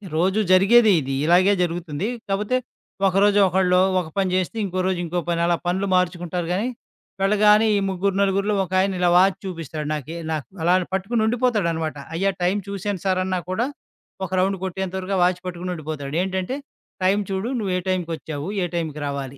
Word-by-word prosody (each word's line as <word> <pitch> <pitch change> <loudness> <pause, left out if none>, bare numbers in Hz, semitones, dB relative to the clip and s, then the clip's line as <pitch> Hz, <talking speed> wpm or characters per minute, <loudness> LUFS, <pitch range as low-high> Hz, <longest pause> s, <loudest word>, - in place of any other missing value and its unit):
రోజు 190 +6 +2
జరిగేది 210 +4 +6
ఇది, 135 0 -4
ఇలాగే 180 +4 +5
జరుగుతుంది. 175 0 -3 0.2
కాపోతే, 210 +6 0 0.5
ఒకరోజు 200 +2 +3
ఒకళ్ళు 180 0 +3 0.2
ఒక - - -7
పని 195 -1 +2
చేస్తే, 185 +4 -1
ఇంకో 185 -1 -3
రోజు 185 -2 0
ఇంకో 175 +2 -2
పని 170 0 0
అలా 170 0 +2
పనులు 190 +3 0
మార్చుకుంటారు 175 -1 -1
గానీ, 205 +6 0 0.5
వెళ్ళగానే 210 +2 +5
ఈ - - +2
ముగ్గురు, 190 +1 -1
నలుగురు‌లో 200 +1 +1
ఒకాయన 190 +1 +1
ఇలా 180 -1 +3
వాచ్ 185 +2 +5
చూపిస్తాడు 160 -4 -5
నాకె 155 +2 -5 0.2
నాకు 150 -6 -3 0.2
అలాని 180 +2 +3
పట్టుకొని 200 +5 0
ఉండిపోతాడనమాట. 205 - 0 0.2
అయ్యా 195 +4 +1
టైం 185 +3 +2
చూసాను 200 -1 -3
సార్ 185 -1 +2
అన్న 185 -1 -1
కూడా, 215 +6 0 0.6
ఒక 185 - -9
రౌండ్ 190 +1 +1
కొట్టేంతవరకు 190 +1 -3
ఆ - - +1
వాచ్ 180 0 +1
పట్టుకొని 180 0 -4
ఉండిపోతాడు. 155 -3 -5
ఏంటంటే, 190 +5 -2 0.5
"టైం 195 +2 +3
చూడు, 190 +5 -2
నువ్వు 195 -4 -2
ఏ - - 0
టైంకొచ్చావు, 165 -4 -3 0.2
ఏ - - +1
టైం‌కి 155 -3 -3
రావాలి?" 140 -1 -5
185 Hz, 165 wpm, -22 LUFS, 170-195 Hz, 0.6 s, జరిగేది